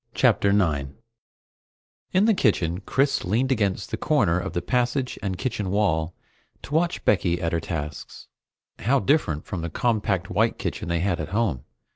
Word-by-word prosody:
CHAPTER 100 - +3
9 75 -9 +1 1.2
In 190 +3 +3
the 225 - +5
kitchen, 90 - +1
Chris 135 +7 +1
leaned 120 +8 +1
against 100 -5 0
the 110 - -2
corner 105 - +2
of 85 - -5
the 85 - -1
passage 125 +1 0
and 95 -2 -3
kitchen 105 -5 -2
wall 90 -5 0 0.5
to 145 - -8
watch 170 +2 0
Becky 90 -4 +2
at 85 -1 -1
her 85 - +1
tasks. 75 -2 -6 0.5
How 135 +6 +2
different 130 - +1
from 90 -5 -4
the 85 - -3
compact 105 -2 0
white - - +1
kitchen - - -4
they 85 -1 0
had 90 -2 0
at 80 -1 -4
home! 100 - -1
100 Hz, 165 wpm, -24 LUFS, 85-125 Hz, 1.2 s, the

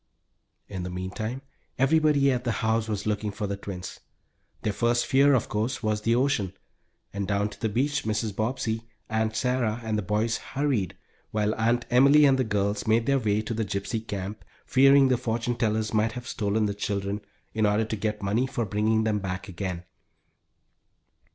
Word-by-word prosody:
In 95 -2 -5
the 90 - -4
meantime 105 +8 -4 0.3
everybody 145 0 +4
at 125 -1 -1
the 120 - 0
house 110 0 +1
was 105 -2 -3
looking 105 0 -1
for 105 +1 -4
the 100 0 -2
twins. 95 -2 -7 0.6
Their 105 - 0
first 120 +2 +1
fear, 140 +1 +5
of 125 - 0
course, 115 +5 -2
was 105 -1 0
the 115 +2 +2
ocean, 120 -8 +1 0.6
and 100 -1 -3
down 100 0 0
to 105 - -13
the 110 - +1
beach 135 +6 0
Mrs. 105 -1 -1
Bobbsey, 115 0 -2 0.2
Aunt 110 0 0
Sarah, 120 -2 0
and 110 -1 -1
the - - -1
boys 105 +3 0
hurried, 130 - -2 0.3
while 105 0 0
Aunt 115 +2 +1
Emily 140 +4 +6
and 135 -1 +4
the - - +3
girls 105 -2 -1
made 115 +1 +3
their 140 +1 +3
way 105 -2 0
to 115 - -3
the 110 0 -1
Gypsy 100 +3 -3
Camp, 100 +2 -5 0.2
fearing 135 0 +6
the 125 - +3
fortune 120 +1 -1
tellers 110 -2 0
might 110 +1 +2
have 125 +1 -7
stolen 105 0 0
the 100 - -1
children 100 0 -2 0.3
in 110 -1 +2
order 105 +2 +2
to 110 - -3
get 105 0 -3
money 110 +6 +1
for 120 -3 -2
bringing 110 +2 +1
them 110 -1 +1
back 95 0 -4
again. 90 -2 -4
110 Hz, 185 wpm, -26 LUFS, 105-120 Hz, 0.6 s, Emily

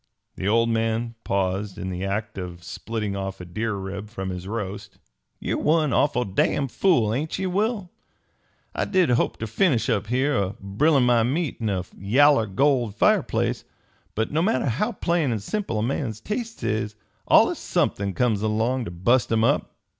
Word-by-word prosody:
The 95 - -3
old 115 +2 +3
man 115 +1 0
paused 95 0 -1
in 95 - -4
the 90 +1 -4
act 105 +1 -3
of 90 -1 -7
splitting 105 -2 -4
off 95 0 -4
a 90 - -7
deer 110 +5 -3
rib 100 +2 -6
from 95 -4 -5
his 90 0 -6
roast. 100 -2 -5 0.4
"Ye're - - -2
one 155 -2 +2
awful 125 -4 +2
damn 120 +7 +1
fool, 120 - +2
ain't 150 +6 -2
ye, 190 - -2
Will? 200 0 -1 0.8
I - - -1
did 185 -8 +2
hope 120 - +1
ter 110 - -4
finish 115 - +1
up - - 0
here, 130 +5 +1
a 100 -4 0
brilin' 135 +9 +2
my 120 -1 +4
meat 145 +7 -1
in 110 -2 -1
a 95 -2 -1
yaller 125 +4 +4
gold 120 0 +1
fireplace; - - +1 0.5
but 110 +1 -1
no 155 +2 +1
matter 220 +6 +1
how 160 - 0
plain 170 - 0
an' 115 - 0
simple 115 - -3
a 105 - 0
man's 120 -3 -2
tastes 225 - -5
is, 110 0 -1 0.3
allus - - +5
somethin' 100 -1 0
comes 110 -2 +1
along 110 +4 0
ter - - -5
bust 105 +10 +1
'em 110 0 +3
up." 140 +5 +1
115 Hz, 175 wpm, -24 LUFS, 100-140 Hz, 0.8 s, allus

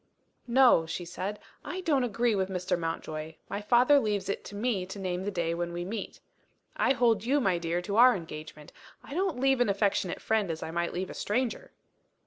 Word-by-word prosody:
"No," 240 -9 +5
she 170 +2 -4
said, 185 +4 -4 0.3
"I 370 - -5
don't 295 -8 +2
agree 235 0 +1
with 190 -2 0
Mr. 180 -1 -1
Mountjoy. 160 -2 -4
My 200 - -3
father 245 +7 +5
leaves 205 -5 -1
it 200 - -2
to 205 - -9
me 210 -3 0
to 190 - -7
name 185 -1 -3
the - - 0
day 170 -4 -1
when 170 0 -3
we 175 0 -4
meet. 210 +2 -5 0.6
I 265 - +3
hold 230 -5 +2
you, 275 +5 +2
my 190 -8 +1
dear, 170 +1 -2
to 200 +3 -2
our 250 +1 +7
engagement 155 -3 -9 0.3
I - - -9
don't 360 -5 -1
leave 270 -1 +3
an 245 - +3
affectionate 195 -2 0
friend 220 -4 0
as 160 -1 -4
I 160 - -5
might 170 +1 -1
leave 185 +2 -3
a - - -7
stranger." 235 +2 -2
200 Hz, 205 wpm, -29 LUFS, 175-245 Hz, 0.6 s, our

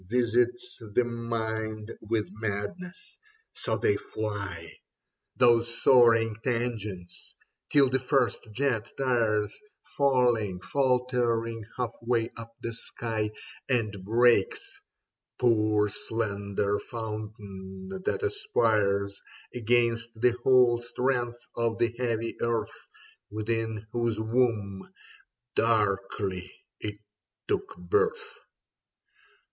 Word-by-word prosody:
Visits 125 - +1 0.2
the 125 - +5
mind 110 -2 -3
with 110 -1 -1
madness. 110 - -5 0.4
So - - -1
they 420 -1 +2
fly, 105 -2 -4
70 - - -10
Leda - - -11 0.7
Those 120 -1 +4
soaring 115 -3 +6
tangents, 110 -7 -3 0.3
till 140 -2 +6
the 130 +1 +1
first 130 -2 +1
jet 120 -2 0
tires, 110 -5 +1 0.4
Failing, 120 -9 +2
faltering 125 -2 +1
half 125 -2 -1
way 115 -1 0
up 115 0 -8
the 115 - -3
sky. 110 -1 -3 0.4
And 110 -6 0
breaks 395 - +2 0.3
— - - -62
poor 110 -3 +3
slender 100 -1 -1
fountain 105 -4 -7
that 435 - -1
aspires 110 - +1 0.3
Against 115 -1 +1
the 125 +1 +5
whole 125 -2 +5
strength 120 0 -1 0.2
of 115 -1 0
the 115 -1 +1
heav}^ 115 -2 -2
earth 115 -1 -2 0.4
Within 110 0 -2
whose 120 -2 0
womb, 110 -4 0 0.6
darkly, 100 -4 0 0.3
it 105 -1 -5 0.5
took 395 -2 -2
birth. 450 +2 0
115 Hz, 100 wpm, -28 LUFS, 105-125 Hz, 0.7 s, soaring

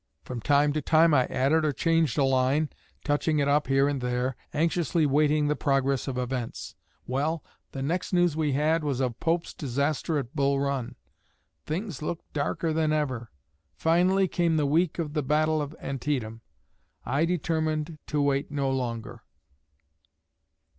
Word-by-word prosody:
From 125 -2 -5
time 145 +2 +3
to 155 - -1
time 160 +2 +4
I 130 -3 +4
added 150 +5 +2
or 155 - +2
changed 165 -1 +1
a 145 - +4
line, 135 +3 +2 0.3
touching 150 +1 +1
it 140 -1 +2
up 145 0 +2
here 135 +1 +3
and 140 -2 -1
there, 125 +1 -1 0.2
anxiously 165 0 +1
waiting 150 +1 +3
the 150 - +1
progress 135 -1 0
of 130 -2 -3
events. 125 -1 -4 0.3
Well, 145 +5 -1 0.3
the 135 - -4
next 170 +6 -2
news 175 -4 +3
we 155 -3 0
had 155 +3 +2
was 140 -4 -1
of 125 -3 -1
Pope's 165 +1 -1
disaster 145 +3 -1
at 130 -2 -5
Bull 140 -1 +2
Run. 140 -3 -2 0.7
Things 170 - -4
looked 165 +2 -5
darker 155 +2 -1
than 155 -1 +1
ever. 130 -7 -1 0.5
Finally, 180 - +3
came 170 -2 +1
the 150 - +2
week 160 +4 +1
of 155 -4 -3
the 155 - 0
battle 155 +2 +1
of 145 +2 -5
Antietam. 130 -5 -3 0.6
I 135 +6 +1
determined 160 -2 -1
to 150 -1 0
wait 140 0 0
no 140 -2 -1
longer. 120 -4 -4
145 Hz, 160 wpm, -27 LUFS, 135-160 Hz, 0.7 s, time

